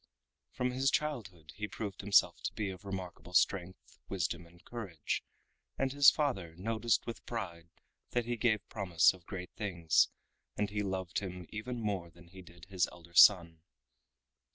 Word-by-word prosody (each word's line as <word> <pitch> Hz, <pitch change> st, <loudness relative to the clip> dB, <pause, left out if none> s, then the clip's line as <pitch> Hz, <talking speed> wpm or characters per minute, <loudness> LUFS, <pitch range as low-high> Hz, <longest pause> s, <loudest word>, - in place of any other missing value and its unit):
From 125 Hz, 0 st, -1 dB
his 130 Hz, +2 st, +2 dB
childhood 100 Hz, -, -3 dB
he 105 Hz, 0 st, -3 dB
proved 105 Hz, -2 st, -5 dB
himself 100 Hz, 0 st, +4 dB
to -, -, -2 dB
be 105 Hz, -3 st, -2 dB
of 95 Hz, +2 st, -11 dB
remarkable 90 Hz, -2 st, -6 dB
strength, 95 Hz, -1 st, 0 dB
wisdom 85 Hz, -2 st, -2 dB
and 85 Hz, +1 st, -21 dB
courage, 100 Hz, -10 st, -4 dB, 0.5 s
and 135 Hz, 0 st, 0 dB
his 140 Hz, 0 st, +9 dB
father 95 Hz, -, -1 dB
noticed 115 Hz, +5 st, 0 dB
with 115 Hz, -4 st, -6 dB
pride 85 Hz, -8 st, -5 dB, 0.4 s
that 120 Hz, -1 st, 0 dB
he 120 Hz, 0 st, -1 dB
gave 110 Hz, -3 st, +1 dB
promise 90 Hz, -6 st, +3 dB
of 90 Hz, -2 st, -17 dB
great 90 Hz, -2 st, -6 dB
things, 85 Hz, -6 st, +2 dB, 0.5 s
and 105 Hz, -1 st, 0 dB
he 105 Hz, 0 st, -1 dB
loved 95 Hz, -3 st, -2 dB
him 90 Hz, -2 st, -6 dB
even 120 Hz, +3 st, -5 dB
more 100 Hz, -6 st, -2 dB
than 85 Hz, 0 st, -18 dB
he 95 Hz, +1 st, -12 dB
did 85 Hz, -1 st, -15 dB
his 95 Hz, -1 st, +1 dB
elder 85 Hz, -1 st, -15 dB
son. 85 Hz, -3 st, +7 dB
95 Hz, 160 wpm, -33 LUFS, 85-110 Hz, 0.5 s, his